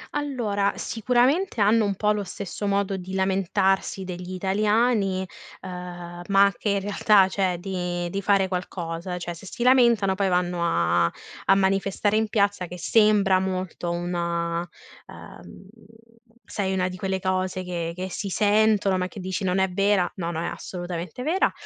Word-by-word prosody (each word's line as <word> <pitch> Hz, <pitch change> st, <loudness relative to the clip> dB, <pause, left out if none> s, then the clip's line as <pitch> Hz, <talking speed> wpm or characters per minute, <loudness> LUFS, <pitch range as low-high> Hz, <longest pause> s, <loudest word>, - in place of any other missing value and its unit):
Allora, 230 Hz, -9 st, 0 dB
sicuramente, 250 Hz, -, +1 dB
hanno 215 Hz, +2 st, +4 dB
un 200 Hz, -1 st, -1 dB
po' 210 Hz, +2 st, +1 dB
lo 210 Hz, -1 st, -1 dB
stesso 200 Hz, +1 st, -5 dB
modo 200 Hz, -1 st, 0 dB
di 185 Hz, +1 st, -6 dB
lamentarsi 190 Hz, 0 st, +1 dB
degli 180 Hz, 0 st, -6 dB
italiani, 200 Hz, 0 st, +1 dB, 0.4 s
uhm, 175 Hz, -1 st, -8 dB
ma 200 Hz, 0 st, +5 dB
che 210 Hz, -, -3 dB
in 200 Hz, -1 st, +1 dB
realtà 205 Hz, -1 st, +4 dB
cioè, 190 Hz, -2 st, 0 dB
di 180 Hz, -2 st, -3 dB
di 200 Hz, +2 st, -2 dB
fare 195 Hz, -1 st, +3 dB
qualcosa; 180 Hz, -1 st, -4 dB
cioè, 175 Hz, -1 st, -5 dB
se 175 Hz, +3 st, -12 dB
si 235 Hz, -, -4 dB
lamentano 235 Hz, -6 st, +4 dB
poi 195 Hz, 0 st, 0 dB
vanno 180 Hz, -1 st, 0 dB
a 85 Hz, -, +2 dB, 0.4 s
a 195 Hz, -, +5 dB
manifestare 195 Hz, +2 st, +1 dB
in 220 Hz, 0 st, +2 dB
piazza 200 Hz, -3 st, +1 dB
che 180 Hz, +1 st, -8 dB
sembra 210 Hz, -1 st, +4 dB
molto 185 Hz, -2 st, -3 dB
una 170 Hz, -1 st, -2 dB, 0.5 s
uhm, 135 Hz, -, -12 dB, 0.8 s
sai, 190 Hz, -3 st, -2 dB
una 185 Hz, -1 st, 0 dB
di 185 Hz, -, -8 dB
quelle 190 Hz, 0 st, -2 dB
cose 185 Hz, 0 st, -1 dB
che 170 Hz, -2 st, -4 dB
che 185 Hz, +1 st, -4 dB
si 200 Hz, +2 st, -4 dB
sentono, 205 Hz, -1 st, +3 dB
ma 180 Hz, -, -1 dB
che 200 Hz, -, -10 dB
dici: 185 Hz, +1 st, -3 dB
"Non 185 Hz, 0 st, +1 dB
è 190 Hz, 0 st, +3 dB
vera!", 195 Hz, -1 st, +2 dB
no, 170 Hz, -2 st, -3 dB
no 165 Hz, -2 st, -3 dB
è -, -, -2 dB
assolutamente 175 Hz, +4 st, -5 dB
vera. 340 Hz, +8 st, +2 dB
190 Hz, 160 wpm, -24 LUFS, 180-205 Hz, 0.8 s, ma